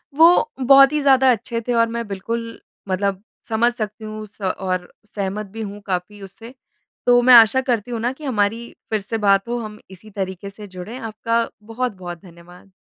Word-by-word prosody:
वो 345 +9 +5
बहुत 275 +2 +7
ही 300 - +1
ज़्यादा 265 -2 +5
अच्छे 230 +1 -2
थे 245 - +1
और 230 0 +3
मैं 235 -1 -4
बिल्कुल 230 +4 -5 0.3
मतलब 195 +1 -1 0.3
समझ 235 +2 +2
सकती 215 -2 -5
हूँ 215 0 -7
स 205 0 -22
और 185 -1 -2 0.2
सहमत 200 +1 -3
भी 220 +3 -9
हूँ 205 0 -7
काफ़ी 195 +2 -4
उससे। 225 +6 -12 0.5
तो 245 0 +5
मैं 250 +1 +6
आशा 230 +3 +7
करती 245 -3 -2
हूँ 230 - -3
ना 240 +2 0
कि 300 +3 -15
हमारी 230 -2 -1
फिर 215 -1 0
से 225 +3 -4
बात 200 0 +2
हो, 240 0 -2
हम 215 -1 -8
इसी 190 +3 -14
तरीके 195 -1 -5
से 205 +1 -11
जुड़े। 185 +6 -8
आपका 230 0 -1 0.2
बहुत-बहुत 210 -7 -5
धन्यवाद। 175 +2 -16
215 Hz, 185 wpm, -21 LUFS, 195-235 Hz, 0.5 s, बहुत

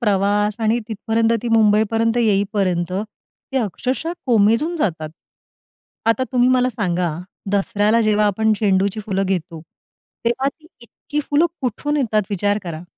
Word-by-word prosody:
प्रवास 205 -1 +1
आणि 225 +2 +2
तिथपर्यंत 225 +1 0
ती 240 - -2
मुंबई 215 -1 +4
पर्यंत 225 +1 +1
येईपर्यंत 195 -5 +1
ते 215 +6 -6
अक्षरशः 255 - -2
कोमेजून 230 +8 +3
जातात. 160 - -1 1.0
आता 230 +3 +2
तुम्ही 250 0 +3
मला 255 0 +3
सांगा, 180 -7 -1 0.4
दसऱ्याला 205 +3 +2
जेव्हा 210 -1 +2
आपण 220 +2 +2
झेंडूची 200 +1 +1
फुलं 195 -2 0
घेतो, 170 -3 -3 0.6
तेव्हा 260 +4 +1
ती 310 +3 -13
इतकी 290 +5 -5
फुलं 300 +4 +4
कुठून 280 +4 -2
येतात 220 -6 +1
विचार 205 +1 0
करा. 170 -1 -6
215 Hz, 135 wpm, -20 LUFS, 200-240 Hz, 1.0 s, मुंबई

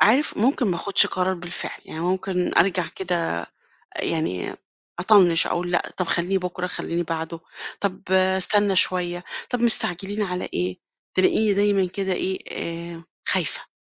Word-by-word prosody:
عارف 260 +8 +4
ممكن 245 +2 +2
ما 180 -3 0
آخُدش 200 +4 +4
قرار 185 0 0
بالفعل، 175 -1 -6
يعني 160 - -7
ممكن 180 +1 -1
أرجع 180 -1 +3
كده 175 - -1 0.6
يعني 155 - -2 0.5
أطنِّش 180 -5 +5
أقول 175 0 -2
لأ، 175 - +3
طَب 185 - -1
خلّيه 180 +3 +1
بكرة، 180 0 -4
خلّيني 175 -1 -2
بعده، 165 0 -4 0.4
طَب 190 -2 -2
أستنّى 190 +2 +3
شوية، 180 -1 +2 0.3
طَب 245 - -1
مستعجلين 205 -3 +2
على 180 -2 -2
إيه؟ 90 +1 -1 0.4
تلاقيني 200 +3 +3
دايمًا 200 -1 +2
كده 190 +1 -3
إيه، 190 +1 -1
آآ 170 0 -6 0.2
خايفة. - - 0
180 Hz, 140 wpm, -23 LUFS, 175-195 Hz, 0.6 s, أطنِّش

